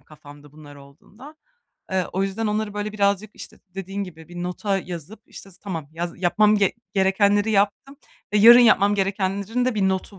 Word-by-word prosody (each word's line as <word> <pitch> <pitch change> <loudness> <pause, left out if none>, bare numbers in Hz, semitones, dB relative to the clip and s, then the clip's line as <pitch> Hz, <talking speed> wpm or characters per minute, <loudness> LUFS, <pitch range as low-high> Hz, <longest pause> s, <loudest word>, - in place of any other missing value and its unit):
kafamda 145 0 -16
bunlar 150 -1 -14
olduğunda. 205 - -16 0.5
Eee, 190 -2 0
o 190 +2 -1
yüzden, 200 +3 -2
onları, 210 0 -2
böyle, 210 0 -4
birazcık, 200 0 0
işte, - - -12
dediğin 195 +2 -6
gibi 160 -3 -13
bir 175 0 -7
nota 195 +2 -2
yazıp 180 +4 -9
işte, 195 - -13
s 180 - -16
tamam. 165 -8 -6
Yaz 170 +2 -5
yapmam 210 +4 +3
ge 200 -2 +2 0.2
gerekenleri 200 +2 +2
yaptım 210 +7 0 0.4
ve 210 - +3
yarın 235 +3 +9
yapmam 205 -3 +4
gerekenlerin 200 +4 -1
de 255 -2 0
bir 195 -2 +1
notu 190 +1 -4
195 Hz, 175 wpm, -22 LUFS, 175-210 Hz, 0.5 s, yarın